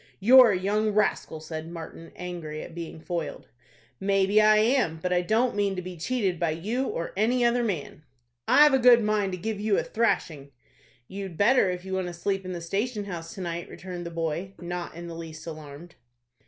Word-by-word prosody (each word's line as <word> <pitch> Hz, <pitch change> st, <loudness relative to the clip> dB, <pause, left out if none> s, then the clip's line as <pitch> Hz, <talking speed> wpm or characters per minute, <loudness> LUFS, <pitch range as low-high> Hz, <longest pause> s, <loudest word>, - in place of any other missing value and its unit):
"You're 250 Hz, +4 st, +8 dB
a 190 Hz, -, +1 dB
young 210 Hz, +3 st, 0 dB
rascal," 205 Hz, -6 st, 0 dB
said 155 Hz, +1 st, -7 dB
Martin, 165 Hz, 0 st, -9 dB
angry 170 Hz, -4 st, -6 dB
at 170 Hz, -, -10 dB
being 165 Hz, -1 st, -7 dB
foiled. 170 Hz, 0 st, -5 dB, 0.5 s
"Maybe 195 Hz, +1 st, +3 dB
I 215 Hz, 0 st, +6 dB
am; 220 Hz, -7 st, +2 dB
but 180 Hz, +2 st, -1 dB
I 180 Hz, -, +3 dB
don't 225 Hz, +7 st, +1 dB
mean 200 Hz, -1 st, 0 dB
to 180 Hz, -, -3 dB
be 180 Hz, 0 st, -7 dB
cheated 190 Hz, 0 st, -1 dB
by 170 Hz, -, +1 dB
you 215 Hz, +12 st, -2 dB
or 165 Hz, -, -4 dB
any 240 Hz, +5 st, +2 dB
other 240 Hz, +1 st, +2 dB
man." 175 Hz, -9 st, -4 dB, 0.5 s
"I've 295 Hz, -1 st, +6 dB
a 265 Hz, -, +4 dB
good 240 Hz, -2 st, +6 dB
mind 210 Hz, -2 st, +1 dB
to -, -, -3 dB
give 210 Hz, +3 st, -4 dB
you 210 Hz, -1 st, +1 dB
a -, -, +1 dB
thrashing." 155 Hz, -11 st, -1 dB, 0.5 s
"You'd 190 Hz, -3 st, -7 dB
better 230 Hz, -1 st, +4 dB
if 180 Hz, 0 st, -4 dB
you 190 Hz, -, -5 dB
want 190 Hz, -1 st, -1 dB
to 175 Hz, -, -6 dB
sleep 195 Hz, +2 st, -2 dB
in 185 Hz, -, -5 dB
the 175 Hz, -, -5 dB
station 205 Hz, +5 st, -2 dB
house 170 Hz, -1 st, -7 dB
to 195 Hz, -, -7 dB
night," 170 Hz, -1 st, -4 dB
returned 175 Hz, -2 st, -7 dB
the -, -, -4 dB
boy, 165 Hz, +3 st, -3 dB
not 175 Hz, -1 st, -5 dB
in 170 Hz, +1 st, -8 dB
the 170 Hz, -, -7 dB
least 165 Hz, -1 st, -9 dB
alarmed. 155 Hz, +1 st, -9 dB
185 Hz, 205 wpm, -26 LUFS, 170-215 Hz, 0.5 s, You're